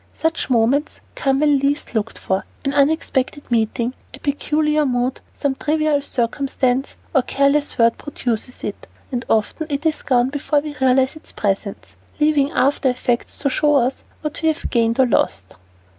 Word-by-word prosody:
Such 320 Hz, -2 st, -1 dB
moments 255 Hz, +5 st, +2 dB
come 270 Hz, 0 st, +1 dB
when 295 Hz, -2 st, +4 dB
least 280 Hz, 0 st, -1 dB
looked 220 Hz, -1 st, -2 dB
for: 190 Hz, 0 st, -1 dB, 0.2 s
an 275 Hz, -, 0 dB
unexpected 290 Hz, -1 st, +1 dB
meeting, 230 Hz, +1 st, +1 dB, 0.2 s
a -, -, -15 dB
peculiar 300 Hz, +1 st, +1 dB
mood, 250 Hz, -1 st, -1 dB
some 280 Hz, -2 st, -1 dB
trivial 305 Hz, +1 st, +1 dB
circumstance, 265 Hz, 0 st, -1 dB, 0.2 s
or 265 Hz, -, +5 dB
careless 280 Hz, +3 st, +1 dB
word 230 Hz, 0 st, +3 dB
produces 250 Hz, -4 st, -4 dB
it, -, -, -5 dB, 0.2 s
and 245 Hz, -1 st, -2 dB
often 225 Hz, +8 st, 0 dB
it 285 Hz, +2 st, -3 dB
is 315 Hz, -1 st, +1 dB
gone 250 Hz, -1 st, +2 dB
before 290 Hz, +1 st, 0 dB
we 295 Hz, 0 st, -6 dB
realize 260 Hz, +1 st, +3 dB
its 310 Hz, -, -8 dB
presence, 200 Hz, 0 st, -3 dB, 0.2 s
leaving 300 Hz, -2 st, +3 dB
aftereffects 255 Hz, -4 st, 0 dB
to 280 Hz, -, +3 dB
show 295 Hz, +2 st, +3 dB
us 260 Hz, 0 st, +1 dB, 0.2 s
what 300 Hz, +1 st, -4 dB
we 320 Hz, -, +1 dB
have 315 Hz, +1 st, -1 dB
gained 230 Hz, +1 st, +2 dB
or 260 Hz, -, +6 dB
lost. 95 Hz, -, 0 dB
275 Hz, 160 wpm, -20 LUFS, 245-295 Hz, 0.2 s, or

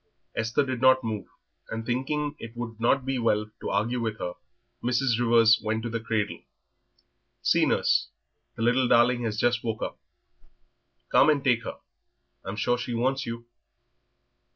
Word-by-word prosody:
Esther 115 Hz, +6 st, +1 dB
did 130 Hz, -2 st, -3 dB
not 130 Hz, 0 st, +5 dB
move, 110 Hz, -3 st, -4 dB, 0.4 s
and 115 Hz, 0 st, -4 dB
thinking 145 Hz, +5 st, -1 dB
that -, -, -6 dB
it 115 Hz, +1 st, -12 dB
would 115 Hz, -2 st, -6 dB
not 130 Hz, +3 st, +2 dB
be 135 Hz, -1 st, -1 dB
well 105 Hz, -2 st, +1 dB
to -, -, -3 dB
argue 115 Hz, +5 st, 0 dB
with 110 Hz, -2 st, -2 dB
her, 90 Hz, -, -4 dB, 0.5 s
Mrs. 120 Hz, -1 st, +1 dB
Rivers 115 Hz, -1 st, +5 dB
went 110 Hz, +1 st, -2 dB
over 115 Hz, -, -4 dB
to -, -, 0 dB
the -, -, -15 dB
cradle. 110 Hz, -2 st, -2 dB, 1.0 s
"See, -, -, +3 dB
nurse, -, -, +2 dB, 0.5 s
the 115 Hz, -, -3 dB
little 125 Hz, +2 st, +3 dB
darling 120 Hz, +1 st, +4 dB
has 110 Hz, -1 st, -2 dB
just 120 Hz, 0 st, +1 dB
woke 110 Hz, -2 st, -3 dB
up; -, -, -5 dB, 1.1 s
come 145 Hz, -, +5 dB
and 145 Hz, -3 st, +2 dB
take 125 Hz, -4 st, +2 dB
her, -, -, -5 dB, 0.7 s
I'm 95 Hz, -, -5 dB
sure 120 Hz, +3 st, 0 dB
she 120 Hz, -1 st, -3 dB
wants 130 Hz, +3 st, 0 dB
you." 115 Hz, 0 st, -6 dB
120 Hz, 170 wpm, -27 LUFS, 115-125 Hz, 1.1 s, not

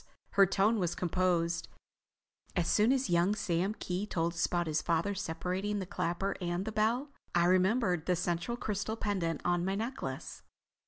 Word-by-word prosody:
Her 195 Hz, -1 st, +6 dB
tone 205 Hz, +4 st, +2 dB
was 175 Hz, -2 st, 0 dB
composed. 175 Hz, -1 st, 0 dB, 0.9 s
"As 175 Hz, -3 st, +1 dB
soon 215 Hz, +3 st, +4 dB
as 270 Hz, -2 st, +2 dB
young 175 Hz, +4 st, +3 dB
Sam 195 Hz, 0 st, 0 dB
Kee 185 Hz, +3 st, -3 dB
told 170 Hz, -3 st, -1 dB
us 165 Hz, -, +1 dB
about 175 Hz, -1 st, 0 dB
his 155 Hz, -1 st, 0 dB
father's 175 Hz, +5 st, 0 dB
separating 185 Hz, +4 st, -2 dB
the 190 Hz, -, -3 dB
clapper 180 Hz, +2 st, -2 dB
and 175 Hz, +2 st, -1 dB
the 220 Hz, -, -3 dB
bell, 235 Hz, +6 st, +1 dB, 0.2 s
I 170 Hz, 0 st, +4 dB
remembered 185 Hz, -1 st, +2 dB
the 180 Hz, -, +3 dB
central 175 Hz, +6 st, -1 dB
crystal 210 Hz, -1 st, -2 dB
pendant 190 Hz, -7 st, -1 dB
on 175 Hz, 0 st, +2 dB
my 190 Hz, +2 st, 0 dB
necklace. 215 Hz, -, -4 dB
185 Hz, 165 wpm, -32 LUFS, 170-210 Hz, 0.9 s, Her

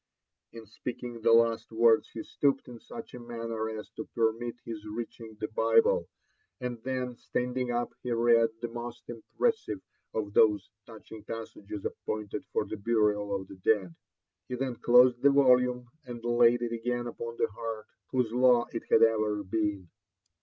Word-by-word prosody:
In 115 Hz, -1 st, -10 dB
speaking 120 Hz, +2 st, -7 dB
the 115 Hz, +1 st, +4 dB
last 115 Hz, 0 st, +3 dB
words 115 Hz, 0 st, +4 dB
he 115 Hz, -, -7 dB
stooped 140 Hz, -1 st, 0 dB
in 120 Hz, -2 st, -10 dB
such 230 Hz, -, -10 dB
a -, -, -7 dB
manner 115 Hz, -2 st, -4 dB
as 110 Hz, -1 st, -6 dB
to -, -, -8 dB
permit 115 Hz, +1 st, 0 dB
his 110 Hz, -2 st, -6 dB
reaching 110 Hz, 0 st, -7 dB
the 110 Hz, 0 st, -4 dB
Bible; 470 Hz, -, +3 dB, 0.5 s
and 125 Hz, -2 st, -4 dB
then 130 Hz, -1 st, -3 dB
stand 125 Hz, +1 st, -3 dB
ing 125 Hz, -1 st, -1 dB
up, 120 Hz, 0 st, -1 dB
he 125 Hz, -, -4 dB
read 115 Hz, 0 st, +4 dB
the 120 Hz, -, -2 dB
most 120 Hz, 0 st, -7 dB
impressive 440 Hz, -, -1 dB, 0.4 s
of 105 Hz, -2 st, -2 dB
those 105 Hz, -2 st, +4 dB, 0.2 s
touching 110 Hz, -1 st, -11 dB
passages 105 Hz, -2 st, -7 dB
ap -, -, -1 dB
pointed 105 Hz, -1 st, -3 dB
for -, -, 0 dB
the 110 Hz, -, -6 dB
burial 105 Hz, -1 st, +1 dB
of 95 Hz, -1 st, -5 dB
the 95 Hz, -, -11 dB
dead. 95 Hz, -2 st, +1 dB, 0.5 s
He 125 Hz, -, -3 dB
then 130 Hz, -1 st, -3 dB
closed 125 Hz, 0 st, +5 dB
the 140 Hz, -, +6 dB
volume, 125 Hz, -3 st, +4 dB, 0.2 s
and 120 Hz, -1 st, -7 dB
laid 120 Hz, 0 st, +4 dB
it 120 Hz, -, -2 dB
again 120 Hz, +1 st, -2 dB
upon 115 Hz, 0 st, -6 dB
the -, -, +1 dB
heart 110 Hz, 0 st, -5 dB, 0.2 s
whose 125 Hz, -4 st, 0 dB
law 125 Hz, -1 st, +4 dB
it 115 Hz, -, -4 dB
had -, -, +6 dB
oyer 110 Hz, -2 st, +2 dB
been 100 Hz, -1 st, -2 dB
115 Hz, 170 wpm, -29 LUFS, 110-125 Hz, 0.5 s, the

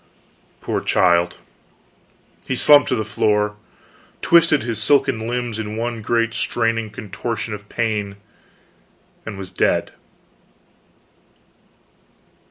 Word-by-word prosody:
Poor -, -, -2 dB
child! 85 Hz, -1 st, +2 dB, 1.1 s
he 130 Hz, -, -1 dB
slumped 145 Hz, +2 st, +6 dB
to -, -, +1 dB
the 110 Hz, -2 st, -2 dB
floor, 105 Hz, 0 st, 0 dB, 0.7 s
twisted 165 Hz, -4 st, +4 dB
his 115 Hz, -2 st, -3 dB
silken 135 Hz, -4 st, +2 dB
limbs 120 Hz, -2 st, -3 dB
in 110 Hz, 0 st, -5 dB
one 115 Hz, 0 st, -3 dB
great 115 Hz, +1 st, 0 dB
straining 115 Hz, -2 st, -1 dB
contortion 110 Hz, +2 st, -5 dB
of 105 Hz, 0 st, -9 dB
pain, 105 Hz, -4 st, -2 dB, 1.1 s
and 105 Hz, -3 st, -6 dB
was 95 Hz, -1 st, -7 dB
dead. -, -, 0 dB
110 Hz, 100 wpm, -20 LUFS, 105-120 Hz, 1.1 s, slumped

